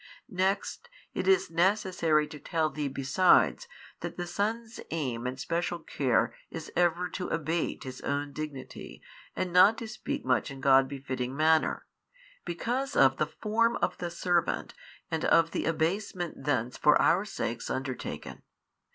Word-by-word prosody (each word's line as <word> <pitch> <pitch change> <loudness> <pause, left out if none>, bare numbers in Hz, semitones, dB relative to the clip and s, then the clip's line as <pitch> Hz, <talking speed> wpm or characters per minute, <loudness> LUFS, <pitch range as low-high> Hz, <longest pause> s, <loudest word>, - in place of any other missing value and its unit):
Next, 195 - -1 0.2
it - - -2
is 385 - +3
necessary 175 -3 +2
to 150 - -9
tell 155 +1 -1
thee 150 +1 -2
besides 160 - +3 0.3
that - - -6
the 175 - -3
Son's 220 +5 -3
aim 125 -7 -2
and 130 +1 -5
special 170 +4 -1
care 135 -6 0 0.2
is - - -7
ever 175 +1 +2
to 185 - -4
abate 165 0 -2
His 130 -1 -8
own 145 0 -2
Dignity 135 - -7 0.3
and 180 -2 -2
not 195 +5 +7
to 230 - -6
speak 285 +5 -5
much - - +1
in 135 -1 -8
God 135 0 +5
befitting 130 -2 -4
manner, 160 0 +2 0.6
because 250 +10 -2
of 135 -1 +5
the 155 - +1
Form 230 +7 +1
of 175 - -1
the 175 - -3
servant 175 0 0 0.4
and 160 -1 -1
of 165 0 +4
the - - -2
abasement 175 +2 -2
thence 125 -4 0
for 150 - +5
our 185 +4 +4
sakes 120 - -4
undertaken. 130 -1 -5
165 Hz, 150 wpm, -29 LUFS, 140-185 Hz, 0.6 s, not